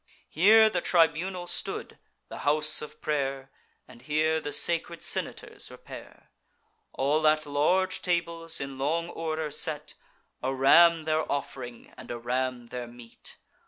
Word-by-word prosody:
Here 220 +7 +6
the 180 -5 -1
tribunal 175 +2 +1
stood, - - -5 0.3
the - - -9
house 150 +1 +2
of 150 - -10
pray'r, 135 -3 -2 0.4
And 125 -2 -15
here 155 +3 +1
the 145 - -5
sacred 170 +1 +1
senators - - -3
repair; - - -12 0.6
All 150 +3 +1
at 155 0 +3
large 180 +6 +1
tables, 170 -2 -1
in 135 -1 -6
long 165 +5 -1
order 160 -2 -3
set, 150 0 -3 0.5
A 135 +1 -1
ram 165 +5 +6
their 155 0 -1
off'ring, 130 -4 -5
and - - -11
a 120 - -4
ram 125 0 -3
their 125 -1 -6
meat. 120 -1 -13
155 Hz, 135 wpm, -28 LUFS, 135-165 Hz, 0.6 s, Here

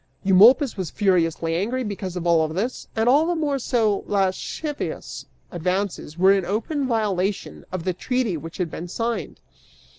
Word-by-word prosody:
Eumolpus 225 +8 +6
was 185 -4 -3
furiously 165 -5 +1
angry 235 +9 -1
because 195 -4 -5
of 175 -1 -4
all 165 -2 +3
this, 195 +11 -3
and 225 +1 +1
all 290 +6 +5
the 350 - 0
more 290 -4 -1
so 225 -5 +1
as - - -19
lascivious 205 +10 -3 0.2
advances 180 -2 -2
were 190 +2 +6
in 195 -1 +1
open 230 - -2
violation 205 -4 -1
of 185 -2 -4
the 185 - -1
treaty 245 +1 -1
which 165 +1 -8
had 175 -4 -2
been 175 - -6
signed. 230 +4 -3
195 Hz, 160 wpm, -23 LUFS, 180-240 Hz, 0.2 s, Eumolpus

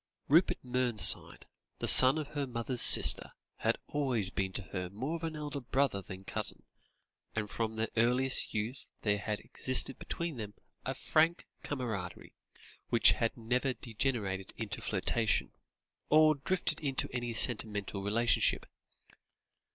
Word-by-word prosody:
Rupert 165 +6 +3
Mernside, 125 -3 +1 0.3
the - - -4
son 130 +3 +8
of 150 -2 -5
her 145 -2 -4
mother's 120 0 -3
sister, - - +7 0.2
had - - 0
always 125 -10 0
been 95 -1 -3
to 95 - -2
her 90 -2 -4
more 130 - -5
of 160 -1 -4
elder 150 -1 -5
brother 130 -4 -1
than 95 0 -10
cousin, - - -1 0.7
and 110 -1 -2
from 110 +1 -4
their 110 +1 -2
earliest 125 +3 +2
youth 110 +5 -5 0.2
there 105 -1 +1
had 105 +1 -4
existed 130 +1 -2
between 170 -5 -5
them 105 -2 -7 0.3
a 130 - -3
frank 160 +5 +1 0.2
camaraderie 110 -10 -6 0.6
which 115 -4 +5
had 115 +3 -2
never 125 +3 -1
degenerated 105 -6 -3
into 105 -2 -5
flirtation, 110 +2 -1 0.6
or 155 0 +5
drifted 170 +6 -1
into 135 -3 -2
any 120 -1 -3
sentimental 105 -4 0
relationship. 115 +4 +1
120 Hz, 135 wpm, -31 LUFS, 105-135 Hz, 0.7 s, son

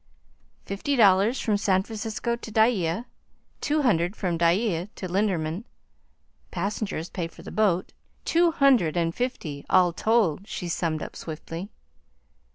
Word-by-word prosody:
"Fifty 200 +9 -2
dollars 205 +1 +5
from 210 -2 +1
San 190 -2 +2
Francisco 225 +2 -3
to 230 -1 -9
Dyea, 220 -3 +2 0.6
two 300 0 +1
hundred 180 -5 +2
from 180 -5 -1
Dyea 175 +2 +1
to 185 - -5
Linderman, 180 -2 0 0.9
passengers 195 -2 -3
pay 175 -3 -4
for - - -15
the - - -8
boat 195 -5 +1 0.3
two 340 +1 +4
hundred 265 - +3
and 165 -1 +1
fifty 165 - -3
all 180 -2 +4
told," 205 -3 +1
she 175 - -5
summed 165 -2 -1
up - - -8
swiftly. 165 +4 -7
195 Hz, 135 wpm, -26 LUFS, 170-225 Hz, 0.9 s, dollars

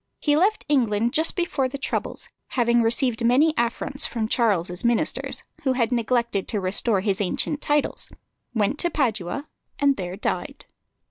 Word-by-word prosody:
He 295 -1 +2
left 395 +7 +2
England 235 -5 +1
just 315 +1 +2
before 335 -7 0
the 270 +2 -6
troubles, 275 - -3 0.2
having 235 -1 +2
received 235 0 +2
many 270 +7 +4
affronts 245 +4 -1
from 225 -2 -2
Charles's 190 -7 +1
ministers, 235 -1 0 0.2
who 265 -2 +1
had 245 -2 0
neglected 235 -4 0
to 210 - -1
restore 195 +2 +1
his 200 0 0
ancient 285 +9 -1
titles, 295 -1 +1 0.4
went 225 +4 0
to 345 - +2
Padua, 240 - -1 0.3
and 280 -1 +2
there 180 -1 -4
died. 205 - -4
235 Hz, 150 wpm, -24 LUFS, 215-280 Hz, 0.4 s, many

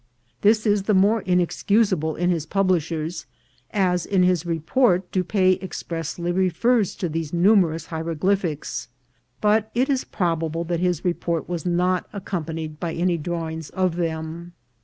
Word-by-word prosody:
This 215 +2 +4
is 205 -1 +3
the 205 +1 +1
more 205 +4 +4
inexcusable 180 -2 +1
in 175 +2 +1
his 160 -3 -2
publishers, 170 -3 -1 0.4
as 180 -3 +1
in 190 -2 +2
his 180 -2 +2
report 180 - +1
Dupaix 185 0 +2
expressly 170 -2 -4
refers 190 +5 +2
to 180 - -2
these 160 -1 -3
numerous 175 -2 +3
hieroglyph 165 +4 0
ics; 145 -7 -4 0.5
but 215 +1 +3
it 260 +4 +2
is 265 -2 +1
probable 165 -3 -1
that 170 0 -2
his 180 -2 0
report 170 -2 -1
was 175 -1 -3
not 180 +1 0
accom 190 -4 -4
panied 160 -2 -5
by 170 -2 -3
any 175 0 +1
drawings 160 -1 -4
of 185 -3 0
them. 165 0 -4
175 Hz, 145 wpm, -23 LUFS, 165-190 Hz, 0.5 s, This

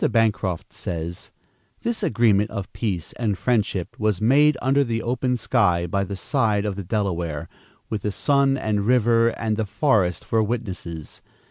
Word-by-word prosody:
Bancroft 105 -6 0
says: 85 0 -5 0.5
"This 235 -1 -2
agreement 105 -2 +3
of 100 -1 -6
peace 95 -8 -3
and 105 -5 0
friendship 105 -7 0
was 105 -3 +1
made 145 +7 +4
under 135 +2 +3
the 115 -3 -2
open 125 +1 0
sky, 90 -6 +2
by 100 +3 0
the 100 +1 -5
side 105 -2 0
of 100 -2 -2
the 100 - -5
Delaware, 85 -6 -2 0.4
with 110 -2 -3
the 105 - -1
sun 140 +4 +2
and 105 -4 -1
river 115 -1 +4
and 110 -2 -2
the 110 - 0
forest 105 - +1
for 115 - +2
witnesses. 95 -8 -4
110 Hz, 155 wpm, -23 LUFS, 95-120 Hz, 0.5 s, made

